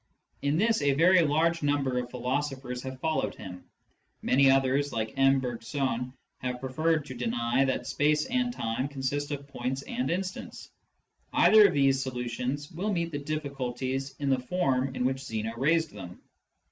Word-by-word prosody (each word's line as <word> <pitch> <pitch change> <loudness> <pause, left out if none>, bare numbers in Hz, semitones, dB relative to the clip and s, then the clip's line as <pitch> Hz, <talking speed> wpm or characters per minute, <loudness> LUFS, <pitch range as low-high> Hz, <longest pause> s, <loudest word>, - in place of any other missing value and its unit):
In 145 +2 +1
this 220 +2 +2
a 140 -1 +3
very 175 +5 +5
large 165 +2 +2
number 140 -3 +1
of 125 -1 -5
philoso 130 +3 -2
phers 125 -2 -6
have 130 0 -7
followed 160 +2 -1
him. 90 -2 -9 0.6
Many 135 +1 +4
others, 135 +1 +2
like 110 -1 -3
M. 135 0 +4
Bergson, 125 0 -3 0.3
have 125 -1 -3
preferred 155 +4 0
to 135 - -7
deny 120 +1 0
that 130 - -1
space 150 +1 +1
and 250 -1 0
time 115 - -2
consist 140 +1 -3
of 140 -1 -5
points 130 0 -4
and 245 +1 -3
instants. 185 +2 -4 0.6
Either 215 -1 +7
of 175 - -2
these 135 -1 +3
solutions 125 +2 -3
will 190 +6 -2
meet 170 -3 -1
the 145 - -3
diflliculties 135 -3 -3
in 140 -1 -1
the 130 - +2
form 130 -2 0
in 125 - -1
which 130 +1 0
Zeno 115 -4 -4
raised 160 +6 +2
them. 90 -3 -9
135 Hz, 165 wpm, -28 LUFS, 125-150 Hz, 0.6 s, Either